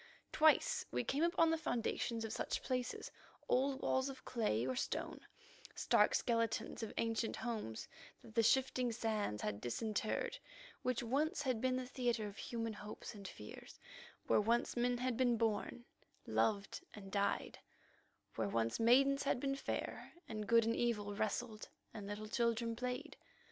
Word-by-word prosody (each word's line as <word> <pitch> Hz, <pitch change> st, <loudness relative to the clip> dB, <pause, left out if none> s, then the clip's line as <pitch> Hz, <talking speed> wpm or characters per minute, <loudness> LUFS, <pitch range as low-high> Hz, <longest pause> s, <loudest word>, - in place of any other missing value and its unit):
Twice 315 Hz, +11 st, +4 dB
we -, -, -1 dB
came 280 Hz, +3 st, 0 dB
upon 335 Hz, -1 st, +4 dB
the 325 Hz, -, +1 dB
foundations 230 Hz, -3 st, -1 dB
of 220 Hz, -, -4 dB
such -, -, -2 dB
places, 250 Hz, -2 st, -2 dB, 0.4 s
old 270 Hz, +1 st, +2 dB
walls 260 Hz, +1 st, +2 dB
of 265 Hz, -, -9 dB
clay 170 Hz, -, 0 dB
or 130 Hz, 0 st, -1 dB
stone, -, -, -2 dB, 0.6 s
stark -, -, +4 dB
skeletons 230 Hz, -2 st, 0 dB
of 225 Hz, -, -3 dB
ancient 225 Hz, 0 st, 0 dB
homes 220 Hz, -, -4 dB, 0.4 s
that 225 Hz, -, -13 dB
the 230 Hz, -, +4 dB
shifting 250 Hz, +1 st, +3 dB
sands 215 Hz, -, -1 dB
had 105 Hz, -1 st, -2 dB
disinterred, 220 Hz, -, -1 dB, 0.4 s
which 250 Hz, -1 st, 0 dB
once 290 Hz, +5 st, +1 dB
had 255 Hz, -5 st, 0 dB
been 255 Hz, 0 st, +2 dB
the 255 Hz, 0 st, -2 dB
theatre 245 Hz, -3 st, 0 dB
of 205 Hz, 0 st, -7 dB
human 230 Hz, -2 st, -3 dB
hopes 210 Hz, +2 st, -8 dB
and 200 Hz, -2 st, -8 dB
fears, 105 Hz, -11 st, -10 dB, 0.5 s
where -, -, +4 dB
once 235 Hz, +3 st, +1 dB
men 245 Hz, 0 st, +2 dB
had 250 Hz, -1 st, -1 dB
been 245 Hz, -2 st, +3 dB
born, 225 Hz, +2 st, -1 dB, 0.4 s
loved, 200 Hz, -3 st, 0 dB
and 195 Hz, -2 st, -9 dB
died, 200 Hz, 0 st, 0 dB, 0.7 s
where -, -, -1 dB
once 115 Hz, +1 st, 0 dB
maidens 275 Hz, +4 st, +5 dB
had 275 Hz, -, +1 dB
been 275 Hz, +1 st, 0 dB
fair, 275 Hz, -, -4 dB
and 215 Hz, -1 st, -4 dB
good 230 Hz, -1 st, +6 dB
and 230 Hz, -, +1 dB
evil 210 Hz, -4 st, 0 dB
wrestled, 215 Hz, +1 st, -2 dB, 0.2 s
and 205 Hz, -2 st, -6 dB
little 205 Hz, +1 st, -5 dB
children 230 Hz, 0 st, +1 dB
played. 250 Hz, +1 st, -4 dB
230 Hz, 155 wpm, -38 LUFS, 215-255 Hz, 0.7 s, good